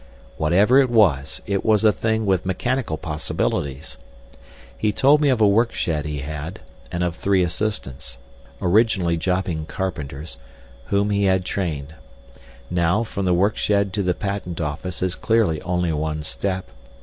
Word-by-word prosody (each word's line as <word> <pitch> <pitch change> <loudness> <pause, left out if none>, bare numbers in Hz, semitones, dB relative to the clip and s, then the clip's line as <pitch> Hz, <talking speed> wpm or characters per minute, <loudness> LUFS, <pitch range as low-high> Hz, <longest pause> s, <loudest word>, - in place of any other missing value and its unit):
Whatever 100 - +4
it 135 -2 +3
was, 95 - +2
it 100 -1 -1
was 110 -1 +3
a 110 - +6
thing 110 0 -1
with 95 -3 +2
mechanical 110 -1 -1
possibilities. 70 -4 -3 0.8
He 105 - 0
told 140 +8 +4
me 145 - +4
of 125 -4 +2
a 105 - +6
work 115 +4 +3
shed 75 -4 -1
he 75 -2 -3
had, 75 +3 -6 0.3
and 90 0 -1
of 90 -1 -1
three 95 +2 +2
assistants—originally 85 - -1
jobbing 90 -2 -1
carpenters—whom 70 +1 -4
he 100 0 +2
had 95 -1 +2
trained. 80 -7 -3 0.8
Now, 90 +5 +2
from 100 -4 -4
the 90 - +3
work 100 +5 +2
shed 100 -2 +1
to 105 - 0
the 90 -2 0
patent 100 -4 -4
office 85 +4 -3
is 90 -1 0
clearly 110 -9 +1
only 90 -2 0
one 75 0 -2
step. 95 -2 -3
90 Hz, 150 wpm, -22 LUFS, 75-100 Hz, 0.8 s, a